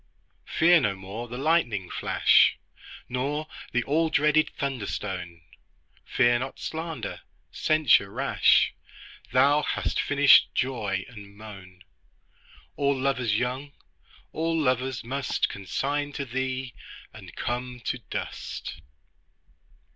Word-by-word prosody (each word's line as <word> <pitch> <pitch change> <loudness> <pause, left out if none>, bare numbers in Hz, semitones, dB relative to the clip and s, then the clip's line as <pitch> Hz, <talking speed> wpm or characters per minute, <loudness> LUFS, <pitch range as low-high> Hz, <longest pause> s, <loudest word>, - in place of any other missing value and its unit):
Fear 170 +1 +5
no 105 -6 0
more 100 +5 -7
the 120 +1 -7
lightning 130 - +1
flash - - +4 0.5
Nor 140 +5 -2 0.3
the 120 0 +1
all 160 +5 +1
dreaded 150 +1 +3
thunder 135 -7 -3
stone; 90 -4 -5 0.7
Fear 120 0 +3
not 130 +1 -5
slander, 160 -5 -5 0.3
censure 155 -10 +3
rash; - - +3 0.6
Thou 140 +3 +4
hast - - -1
finished 145 0 +5
joy 105 -7 -1
and 100 -4 -13
moan: 95 -4 -12 0.9
All 140 -1 +1
lovers 130 -5 +1
young, 130 +4 -3 0.6
all 165 +1 -1
lovers 130 -2 0
must 135 +3 -1
Consign 145 +9 -3
to 140 - -4
thee, 130 0 -3 0.4
and - - -12
come 125 0 -4
to 125 +1 -3
dust. - - -6
130 Hz, 110 wpm, -26 LUFS, 110-145 Hz, 0.9 s, Fear